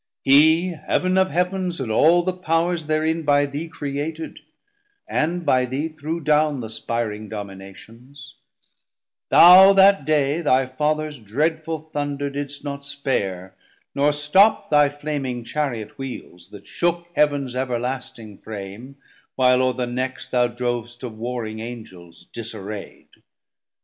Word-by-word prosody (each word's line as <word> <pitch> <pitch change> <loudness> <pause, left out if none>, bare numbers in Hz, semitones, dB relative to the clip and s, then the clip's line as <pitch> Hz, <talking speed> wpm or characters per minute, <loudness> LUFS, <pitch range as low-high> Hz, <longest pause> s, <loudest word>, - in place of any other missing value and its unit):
Hee 160 +6 +5 0.2
Heav'n 185 0 +1
of 190 0 +3
Heavens 180 +1 -1
and 125 -4 -3
all 165 +9 +4
the 185 +1 -1
Powers 170 -2 -1
therein 160 +1 0
390 - - -13
By 145 0 +4
thee 145 +4 -5
created, 150 +3 -5 0.7
and 170 +3 -1
by 130 -3 +3
thee 135 +6 -3
threw 155 +1 -5
down 150 -2 +2
Th' - - -5
aspiring 110 -1 -4
Dominations: 110 +7 -10 1.0
thou 185 +3 +9
that 195 -3 +5
day 150 +1 +1
Thy 135 -4 +2
Fathers 150 +2 -2
dreadful 160 +9 -2
Thunder 145 -2 -4
didst 145 0 -6
not 140 -1 -6
spare, 100 -10 -3 0.4
Nor 145 +1 +2
stop 150 +10 +3
thy 145 -1 +5
flaming 145 -4 -4
Chariot 120 -4 -4
wheels, 95 -9 -8
that 100 -1 -13
shook 175 +5 -1
Heav'ns 145 -4 +1
everlasting 125 -3 -4
Frame, 110 +5 -9 0.4
while 125 -1 +4
o're 130 -1 +1
the 125 -1 -2
necks 130 +2 -4
Thou 125 -1 +2
drov'st 120 0 -4
of 120 -3 -6
warring 115 -2 -4
Angels 95 -8 -10
disarraid. 105 -2 -8
140 Hz, 130 wpm, -22 LUFS, 120-155 Hz, 1.0 s, thou